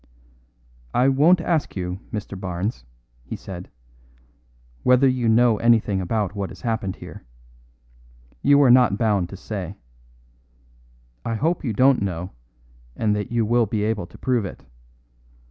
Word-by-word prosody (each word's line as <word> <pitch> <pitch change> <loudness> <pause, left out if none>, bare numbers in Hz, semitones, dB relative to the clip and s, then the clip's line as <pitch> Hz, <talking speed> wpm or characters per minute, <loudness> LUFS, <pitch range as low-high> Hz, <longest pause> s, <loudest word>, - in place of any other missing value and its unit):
"I 130 +2 +4
won't 155 +6 +4
ask 165 -2 -1
you, 90 -1 -4
Mr. 105 -2 -5
Barnes," 90 - -4 0.4
he - - -6
said, 90 -2 -9 1.1
"whether 125 +2 +4
you 125 -3 +1
know 115 0 +4
anything 110 -4 +2
about 100 +1 -1
what 100 -2 -4
has - - -12
happened 110 -5 -2
here. - - -11 1.2
You 140 +1 +5
are 130 - +6
not 120 -5 +5
bound 105 -6 +1
to 95 - -9
say. 100 -2 -6 1.5
I 115 - -2
hope 160 +9 0
you 120 -6 -1
don't 130 +3 +4
know, 90 -2 -3 0.6
and 105 -2 +1
that 105 +1 -4
you 115 -2 +1
will 120 +1 +2
be 105 +1 -1
able 105 -5 -1
to - - -15
prove 125 -4 0
it. 100 - -8
110 Hz, 145 wpm, -23 LUFS, 95-125 Hz, 1.5 s, are